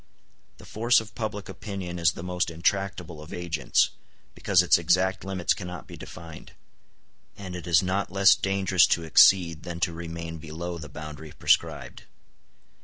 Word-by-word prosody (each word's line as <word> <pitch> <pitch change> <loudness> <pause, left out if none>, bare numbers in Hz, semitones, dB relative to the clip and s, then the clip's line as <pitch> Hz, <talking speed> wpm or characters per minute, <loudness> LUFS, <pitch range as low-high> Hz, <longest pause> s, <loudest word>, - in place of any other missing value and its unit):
The - - -14
force 115 +2 +3
of 110 0 -10
public 105 -3 -5
opinion 95 -5 -6
is 85 -1 +3
the - - -8
most 90 -1 -1
intractable 85 -1 -2
of 80 - -12
agents, 85 -3 0 0.4
because 95 -3 +3
its 90 - +4
exact 90 +3 +1
limits 95 -2 0
cannot 90 -3 -8
be - - -11
defined; 80 -1 -11 0.8
and 95 -3 -7
it 90 -1 -7
is 85 -1 +4
not 95 +1 -1
less 100 0 +6
dangerous 95 -2 +2
to 85 - +1
exceed 85 0 +5
than 85 0 -7
to 85 0 0
remain 85 0 -7
below 85 +3 -6
the 80 - -9
boundary 75 0 -9
prescribed. - - 0
90 Hz, 155 wpm, -26 LUFS, 85-95 Hz, 0.8 s, less